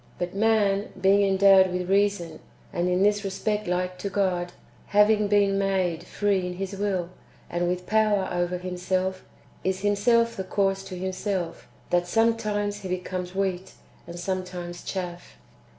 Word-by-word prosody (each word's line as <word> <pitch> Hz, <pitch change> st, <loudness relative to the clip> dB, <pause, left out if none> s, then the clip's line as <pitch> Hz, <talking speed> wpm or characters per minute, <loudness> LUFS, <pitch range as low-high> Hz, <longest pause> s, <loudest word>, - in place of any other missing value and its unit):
But 175 Hz, 0 st, -3 dB
man, 205 Hz, -1 st, +2 dB
being 195 Hz, +2 st, +4 dB
endowed 195 Hz, -1 st, +5 dB
with 180 Hz, 0 st, -2 dB
reason, 195 Hz, -5 st, +1 dB, 0.3 s
and 175 Hz, +1 st, 0 dB
in 180 Hz, +1 st, +2 dB
this 205 Hz, 0 st, +2 dB
respect 210 Hz, +1 st, -2 dB
like 180 Hz, +1 st, -1 dB
to 200 Hz, -, -3 dB
God, 185 Hz, -3 st, 0 dB, 0.4 s
having 210 Hz, 0 st, +4 dB
been 200 Hz, -1 st, +3 dB
made 185 Hz, -4 st, 0 dB
free 200 Hz, -3 st, 0 dB
in 180 Hz, -, -4 dB
his 195 Hz, +1 st, -4 dB
will, 190 Hz, -3 st, -1 dB, 0.4 s
and 175 Hz, 0 st, 0 dB
with 180 Hz, 0 st, -2 dB
power 215 Hz, -3 st, +2 dB
over 175 Hz, 0 st, -1 dB
himself, 185 Hz, +1 st, -2 dB, 0.4 s
is 190 Hz, 0 st, -1 dB
himself 230 Hz, +3 st, +2 dB
the 190 Hz, -, -3 dB
cause 195 Hz, 0 st, 0 dB
to 185 Hz, -2 st, -7 dB
himself, 185 Hz, -1 st, -3 dB, 0.2 s
that 175 Hz, 0 st, +2 dB
sometimes 210 Hz, -1 st, +1 dB
he 190 Hz, -2 st, -7 dB
becomes 180 Hz, 0 st, -4 dB
wheat, 190 Hz, -2 st, -2 dB, 0.3 s
and 170 Hz, 0 st, -7 dB
sometimes 180 Hz, -2 st, -4 dB
chaff. 175 Hz, -2 st, -6 dB
190 Hz, 150 wpm, -26 LUFS, 180-205 Hz, 0.4 s, endowed